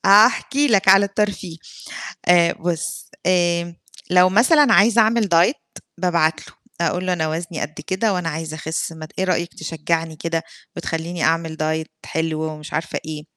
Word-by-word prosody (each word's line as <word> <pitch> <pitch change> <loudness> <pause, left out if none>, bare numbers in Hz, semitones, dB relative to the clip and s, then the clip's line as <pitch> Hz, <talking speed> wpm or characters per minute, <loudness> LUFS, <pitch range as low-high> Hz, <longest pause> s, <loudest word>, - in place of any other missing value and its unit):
هاحكي 230 +8 +5
لك 195 -5 +2
على 195 +1 +7
الترفيه، 200 -4 -3 0.7
آآ 175 -1 +5
بُص، 170 0 -4 0.2
آآ 175 -1 +1 0.4
لو 180 0 +6
مثلًا 255 - +4
عايزة 225 +3 +5
أعمل 220 -1 +1
Diet، 175 - +1 0.2
بابعت 170 -3 +1
له، - - -17 0.3
أقول 180 +2 -1
له: 185 - +1
"أنا 160 -3 -1
وزني 165 +1 -4
قد 155 0 -5
كده، 200 +3 0
وأنا 180 -2 -2
عايزة 160 0 -5
أخس 160 +1 -4
ما 155 -1 -9
ت - - -25
إيه 190 - +1
رأيك 175 -2 -1
تشجّعني 165 0 -3
كده 165 +1 -2 0.3
وتخلّيني 170 0 -4
أعمل 165 -1 0
Diet 155 +1 -2 0.2
حلو،" 160 -1 -2
ومش 155 -1 -6
عارفة 160 +1 -2
إيه. 155 -1 -6
170 Hz, 160 wpm, -20 LUFS, 160-190 Hz, 0.7 s, على